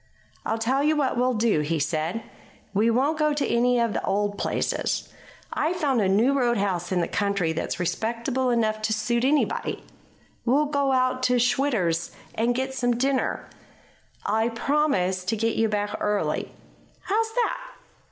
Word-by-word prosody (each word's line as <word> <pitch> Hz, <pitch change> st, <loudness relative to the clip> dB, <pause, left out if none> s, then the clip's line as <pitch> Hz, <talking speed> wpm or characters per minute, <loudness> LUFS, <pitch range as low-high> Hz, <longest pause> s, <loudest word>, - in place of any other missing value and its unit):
"I'll 225 Hz, -, 0 dB
tell 255 Hz, +5 st, +1 dB
you 310 Hz, +1 st, +3 dB
what 285 Hz, -3 st, +1 dB
we'll 250 Hz, +1 st, +1 dB
do," 215 Hz, -6 st, +2 dB
he 155 Hz, +2 st, 0 dB
said. 155 Hz, +8 st, -1 dB, 0.5 s
"We 215 Hz, +3 st, +3 dB
won't 275 Hz, +7 st, +1 dB
go 305 Hz, -1 st, +3 dB
to 290 Hz, -, 0 dB
any 245 Hz, +1 st, +2 dB
of 230 Hz, -2 st, +1 dB
the -, -, -2 dB
old 205 Hz, +1 st, 0 dB
places. -, -, -2 dB, 0.4 s
I've 325 Hz, +4 st, 0 dB
found 275 Hz, -9 st, +1 dB
a 190 Hz, -, +2 dB
new 225 Hz, +8 st, +3 dB
roadhouse 200 Hz, -9 st, 0 dB
in 180 Hz, -2 st, +2 dB
the -, -, 0 dB
country 200 Hz, -5 st, 0 dB
that's 165 Hz, -, -3 dB
respectable 230 Hz, +8 st, -1 dB
enough 220 Hz, -3 st, +1 dB
to 220 Hz, 0 st, 0 dB
suit 235 Hz, +2 st, 0 dB
anybody. 290 Hz, +3 st, 0 dB, 0.6 s
We'll 275 Hz, +5 st, +3 dB
go 280 Hz, -2 st, 0 dB
out 255 Hz, 0 st, +1 dB
to 250 Hz, 0 st, +3 dB
Schwitter's 235 Hz, -9 st, +1 dB, 0.2 s
and 235 Hz, +2 st, +1 dB
get 265 Hz, +1 st, -2 dB
some 245 Hz, -2 st, +1 dB
dinner. 265 Hz, +1 st, 0 dB, 0.8 s
I'll 220 Hz, +3 st, +1 dB
promise 230 Hz, -8 st, 0 dB
to 215 Hz, +5 st, 0 dB
get 225 Hz, +1 st, 0 dB
you 225 Hz, 0 st, +2 dB
back 205 Hz, 0 st, -1 dB
early. 210 Hz, -1 st, -1 dB, 0.5 s
How's 445 Hz, +2 st, 0 dB
that?" -, -, +1 dB
235 Hz, 160 wpm, -25 LUFS, 205-265 Hz, 0.8 s, you